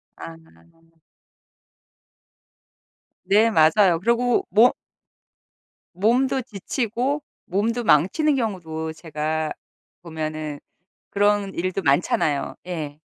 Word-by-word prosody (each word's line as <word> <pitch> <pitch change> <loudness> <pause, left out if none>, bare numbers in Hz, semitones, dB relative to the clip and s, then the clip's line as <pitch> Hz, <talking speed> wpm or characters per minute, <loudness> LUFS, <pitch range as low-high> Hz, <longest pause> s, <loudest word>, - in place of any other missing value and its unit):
아. 80 0 -9 2.9
네 210 +4 +4
맞아요. 170 0 +4
그리고 235 +2 +1
모 225 +5 +6 1.2
몸도 250 +8 +1
지치고 240 +6 -3 0.2
몸도 225 +6 -1
망치는 250 - +3
경우도 160 -9 -3
제가 155 -1 -3 0.5
보면은 155 -3 -5 0.5
그런 205 -1 +1
일도 185 +2 -2
많잖아요. 145 -1 +1
예. 155 -4 -6
185 Hz, 165 characters per minute, -23 LUFS, 155-230 Hz, 2.9 s, 모